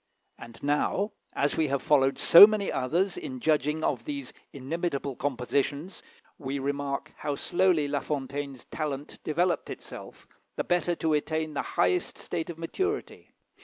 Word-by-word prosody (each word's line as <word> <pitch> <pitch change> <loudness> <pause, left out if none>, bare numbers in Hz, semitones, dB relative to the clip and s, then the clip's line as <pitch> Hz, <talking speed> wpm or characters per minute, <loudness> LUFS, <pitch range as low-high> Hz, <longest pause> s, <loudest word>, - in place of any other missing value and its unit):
And 115 0 -12
now, 150 +8 +1 0.2
as 145 - 0
we 160 - +2
have 140 -1 -1
followed 135 -2 +3
so 175 +5 +10
many 215 -2 -1
others 170 - 0
in 285 -7 -6
judging 155 - +1
of - - 0
these 285 -2 -5 0.2
inimitable 140 -1 -3
compositions, 140 +6 -2 0.4
we 140 -2 -3
remark 140 +1 -3
how 145 - -2
slowly 175 -1 +2
La 145 0 0
Fontaine's 140 -2 -4
talent 145 -2 -5
developed 170 +3 0
itself, - - -9 0.3
the - - -1
better 175 0 +1
to 160 -1 0
attain 155 +1 -1
the 140 - -1 0.2
highest 360 -1 +1
state 165 - -4
of 170 - -6
maturity. 380 - -3
150 Hz, 145 wpm, -28 LUFS, 140-175 Hz, 0.4 s, so